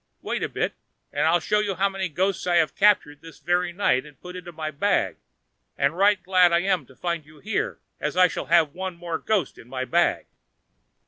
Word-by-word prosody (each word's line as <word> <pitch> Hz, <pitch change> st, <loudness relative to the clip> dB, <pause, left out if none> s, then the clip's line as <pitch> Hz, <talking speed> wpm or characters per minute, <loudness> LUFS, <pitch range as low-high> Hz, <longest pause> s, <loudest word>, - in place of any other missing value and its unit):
wait -, -, -2 dB
a -, -, -1 dB
bit -, -, -2 dB, 0.4 s
and 145 Hz, +2 st, +1 dB
I'll 170 Hz, +2 st, +4 dB
show 210 Hz, +5 st, +1 dB
you 205 Hz, -2 st, -1 dB
how 195 Hz, +3 st, +2 dB
many 195 Hz, -2 st, -3 dB
ghosts 185 Hz, +5 st, -1 dB
I 175 Hz, -, +2 dB
have 165 Hz, -2 st, +3 dB
captured 195 Hz, -8 st, +3 dB
this 165 Hz, -1 st, -13 dB
very 175 Hz, 0 st, 0 dB
night 170 Hz, -8 st, +1 dB
and 150 Hz, -1 st, -16 dB
put 180 Hz, 0 st, -10 dB
into 180 Hz, -1 st, -8 dB
my 155 Hz, -1 st, -5 dB
bag; 140 Hz, -, 0 dB, 0.6 s
and 140 Hz, +3 st, +1 dB
right 200 Hz, +2 st, +4 dB
glad 180 Hz, -1 st, +4 dB
am 175 Hz, +1 st, +2 dB
I -, -, -20 dB
to 130 Hz, -, -19 dB
find 170 Hz, 0 st, -3 dB
you 155 Hz, +1 st, -18 dB
here, 205 Hz, +7 st, -2 dB, 0.2 s
as 150 Hz, +3 st, -3 dB
I 185 Hz, 0 st, +7 dB
shall -, -, -5 dB
have 160 Hz, -3 st, +4 dB
one 185 Hz, 0 st, -5 dB
more 170 Hz, -2 st, -4 dB
ghost 205 Hz, -8 st, -1 dB
in 115 Hz, -, -14 dB
my 130 Hz, 0 st, -3 dB
bag." 170 Hz, +5 st, +1 dB
175 Hz, 215 wpm, -24 LUFS, 155-190 Hz, 0.6 s, I